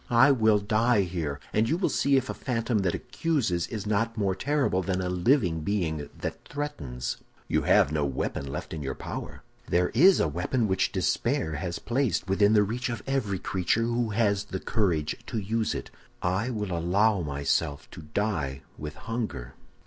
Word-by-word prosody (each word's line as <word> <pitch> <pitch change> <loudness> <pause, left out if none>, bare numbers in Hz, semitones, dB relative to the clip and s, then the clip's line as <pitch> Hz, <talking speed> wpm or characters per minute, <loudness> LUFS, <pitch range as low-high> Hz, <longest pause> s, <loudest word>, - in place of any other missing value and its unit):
I 120 +4 +6
will 110 -5 +4
die 110 +2 +2
here, 85 -6 -3
and 110 +2 +2
you 160 - +2
will 180 - +1
see 140 0 +3
if 130 -1 0
a - - -3
phantom 115 -2 -1
that 95 -3 +1
accuses 120 - -1
is 110 -3 -5
not 115 +2 0
more 100 -3 +1
terrible 135 -3 +1
than 95 0 -1
a 90 -1 -1
living 90 - +2
being 80 -5 -1
that - - -5
threatens!' 75 - -4 0.3
"'You - - +2
shall - - -5
have - - +5
no 75 -1 0
weapon 70 0 -2
left 70 - -5
in 80 - -4
your 65 -2 -3
power.' - - -7 0.2
"'There 90 +1 +2
is 180 - +6
a - - +3
weapon 90 - 0
which 95 -1 +1
despair 80 0 0
has 85 +3 -3
placed 120 -6 0
within 100 +2 +4
the 105 -1 +6
reach 120 +5 -2
of 115 -3 -4
every 130 -8 0
creature 95 +5 0
who 120 0 0
has 105 -2 +1
the 95 -2 -4
courage 85 -10 0
to - - -3
use 110 +2 -1
it. - - -6 0.3
I 95 +7 0
will 105 -7 -2
allow 95 +4 +2
myself 70 -1 -1
to - - -9
die 75 -5 -2 0.2
with 75 0 -6
hunger. 110 - -4
100 Hz, 185 wpm, -27 LUFS, 85-115 Hz, 0.3 s, I